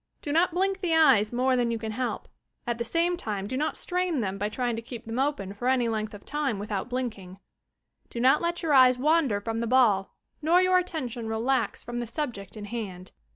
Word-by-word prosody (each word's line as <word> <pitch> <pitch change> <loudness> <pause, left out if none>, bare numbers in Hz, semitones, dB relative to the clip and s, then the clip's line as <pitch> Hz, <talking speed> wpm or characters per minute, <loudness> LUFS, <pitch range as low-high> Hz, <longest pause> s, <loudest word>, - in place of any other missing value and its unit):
Do 290 - -3
not 335 +4 +4
blink 380 +2 0
the 340 -3 +1
eyes 215 -10 +5
more 255 +2 +2
than 240 -1 +1
you 230 - -1
can 220 -1 -5
help; 250 +3 -3 0.4
at 240 -1 -2
the - - 0
same 335 +8 +1
time 205 - -4
do 255 - -4
not 305 +4 -1
strain 360 -4 -1
them 195 -3 -2
by 205 +1 -1
trying 240 +1 -1
to 225 - -4
keep 230 0 -9
them 225 +2 -4
open 270 -9 -1
for 240 +5 -4
any 255 -2 +2
length 215 -1 -3
of 200 - -13
time 290 -7 -1
without 205 +2 -4
blinking. 220 -8 -4 0.7
Do 235 - -6
not 260 +5 +4
let 340 +1 -2
your 315 -3 +1
eyes 255 -2 +7
wander 285 -6 +2
from 225 +2 -3
the 235 - -1
ball 225 -6 +3 0.3
nor 330 +4 +4
your 370 0 +4
attention 255 -10 -4
relax 230 +3 0
from 240 0 -5
the 240 - -4
subject 230 -6 -5
in 210 - -6
hand. 195 -5 -6
245 Hz, 220 wpm, -27 LUFS, 220-300 Hz, 0.7 s, eyes